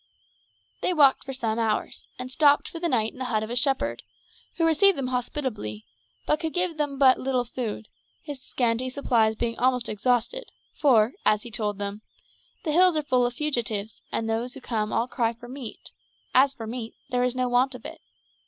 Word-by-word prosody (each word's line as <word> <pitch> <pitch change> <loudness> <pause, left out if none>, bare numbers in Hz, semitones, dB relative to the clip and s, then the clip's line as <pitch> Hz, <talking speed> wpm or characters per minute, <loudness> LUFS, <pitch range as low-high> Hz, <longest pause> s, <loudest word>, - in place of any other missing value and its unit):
They 365 - +1
walked 280 -4 +5
for 270 - -5
some 230 -3 -1
hours, 220 -2 -1
and 255 0 -6
stopped 290 +1 +4
for 335 - -7
the 340 0 0
night 225 -5 +1
in - - -14
the 260 - -2
hut 220 -3 0
of 220 - -6
a - - -2
shepherd, 270 +2 +1 0.5
who 330 - +1
received 350 +4 +4
them 260 -2 -2
hospitably, 245 - -3 0.4
but 300 - +2
could 320 -2 -3
give 355 -3 0
them 290 -2 -2
but 265 -2 +6
little 255 -2 0
food, 225 -3 -5 0.4
his 285 -4 -7
scanty 245 0 -1
supplies 235 -5 +2
being 230 +1 -2
almost 250 -1 +2
exhausted, 245 - 0 0.3
for, 245 -5 +4
as 210 0 +3
he 240 - -9
told 210 -2 -2
them, 200 +1 -4 0.6
"the 310 - -1
hills 355 +1 +5
are 305 - 0
full 255 -4 +2
of 245 - -6
fugitives, 230 -8 -2
and 225 - -1
those 230 +3 -2
who - - -8
come 220 -4 -2
all 235 - +1
cry 235 -3 0
for 235 +1 -13
meal; 255 -2 -7 0.6
as 265 +2 +6
for 230 -4 -7
meat, 230 0 -6 0.2
there 250 0 +1
is 250 0 0
no 255 0 0
want 250 +2 +2
of 245 - -11
it. - - -8
250 Hz, 200 wpm, -26 LUFS, 225-280 Hz, 0.6 s, but